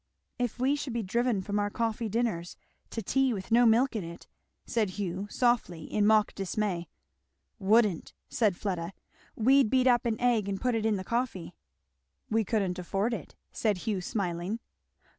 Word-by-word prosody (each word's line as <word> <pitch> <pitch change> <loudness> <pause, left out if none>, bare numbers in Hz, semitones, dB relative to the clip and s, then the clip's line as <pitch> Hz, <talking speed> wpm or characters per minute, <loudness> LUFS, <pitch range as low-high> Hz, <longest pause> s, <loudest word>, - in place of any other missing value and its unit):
"If 245 -2 -1
we 265 +3 +2
should 280 -4 -4
be 235 -1 -1
driven 235 0 0
from 205 +2 -1
our 205 0 0
coffee 225 +1 -2
dinners 200 -6 -2 0.3
to 225 - -4
tea 265 +3 +2
with 190 +3 -7
no 240 +1 +6
milk 235 +3 +3
in 210 - -2
it!" 170 +1 -9 0.4
said 220 -4 0
Hugh 195 0 -3
softly 235 -11 +1
in 210 +4 +1
mock 215 -1 +4
dismay. 195 -3 -2 0.7
"Wouldn't!" 205 -3 +2
said 210 -7 +1
Fleda. 180 -3 -3 0.4
"We'd 265 +1 +4
beat 260 +1 +3
up 245 -1 +4
an 220 -1 -1
egg 235 -5 +2
and 195 -1 -2
put 250 -1 0
it 225 -1 +1
in 215 - +2
the 190 - -3
coffee." 230 -7 -2 0.8
"We 225 0 +3
couldn't 195 -4 -1
afford 195 +6 -1
it," 225 - -6 0.2
said 210 -4 0
Hugh 205 -5 -1
smiling. 180 +1 -2
215 Hz, 170 wpm, -29 LUFS, 190-235 Hz, 0.8 s, no